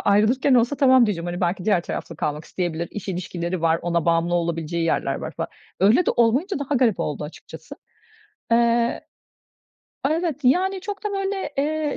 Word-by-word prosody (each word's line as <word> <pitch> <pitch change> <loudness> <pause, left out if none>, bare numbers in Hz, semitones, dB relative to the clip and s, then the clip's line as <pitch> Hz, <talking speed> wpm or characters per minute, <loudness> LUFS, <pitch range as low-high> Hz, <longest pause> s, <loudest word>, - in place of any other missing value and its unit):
ayrılırken 235 +7 +3
olsa 245 +4 +3
"Tamam." 260 -3 +5
diyeceğim, 175 -4 -2
hani, 175 0 -4
belki 180 +1 -1
diğer 195 -5 +2
tarafla 165 - -6
kalmak 150 0 -3
isteyebilir, 170 -2 -3
iş 205 -1 -7
ilişkileri 175 -1 -3
var, 165 0 +3
ona 170 -2 0
bağımlı 170 +1 +2
olabileceği 170 -1 -1
yerler 165 - 0
var - - -5
fa - - -2 0.3
öyle 220 - +4
de - - +4
olmayınca 265 - +2
daha 285 0 -2
garip 235 -6 +2
oldu 150 0 -3
açıkçası. 150 - -11 0.8
Eee 235 0 +2 1.1
Evet, 320 -3 -1
yani 370 +9 +2
çok 400 +2 -6
da 420 - -1
böyle, 390 -3 -2
eee, 300 +1 0
215 Hz, 165 wpm, -23 LUFS, 170-285 Hz, 1.1 s, Tamam